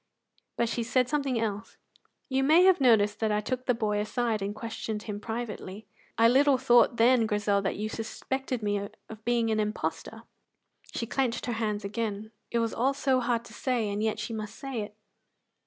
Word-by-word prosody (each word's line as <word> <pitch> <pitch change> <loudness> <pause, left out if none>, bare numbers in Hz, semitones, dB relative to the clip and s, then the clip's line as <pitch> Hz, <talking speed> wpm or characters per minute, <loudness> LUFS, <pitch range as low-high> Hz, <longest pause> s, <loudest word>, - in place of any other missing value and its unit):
But 235 - +2
she 235 - -2
said 250 +2 +1
something 275 -4 0
else: 215 -1 -3 0.5
"You 265 0 +1
may 315 +6 +6
have 370 -5 +5
noticed 215 -4 +4
that 220 -1 +1
I 210 - +2
took 255 +4 -4
the 250 - +3
boy 210 -2 0
aside 220 0 -1
and 200 +1 -3
questioned 220 -1 -5
him 205 -2 -5
privately." 220 -2 -6 0.3
"I 230 +1 +6
little 270 +3 +5
thought 240 -2 +4
then, 230 0 +4
Grizel, 205 -1 +1
that 195 - -1
you 210 +1 -3
suspected 250 +2 -4
me 205 0 +1 0.3
of 220 -1 -11
being 235 -1 +2
an 215 - +1
impostor." 210 0 -3 0.7
She 230 - -3
clenched 245 0 -1
her 240 - -2
hands 210 -2 -2
again; 215 0 -3 0.2
it 235 - -1
was 230 -1 0
all 265 +4 +1
so 265 -2 +2
hard 235 -1 0
to - - -13
say, 240 -5 -1
and 205 +1 -2
yet 220 0 0
she 215 +2 -4
must 215 0 -5
say 270 -5 -4
it! 210 0 -7
225 Hz, 190 wpm, -28 LUFS, 210-250 Hz, 0.7 s, may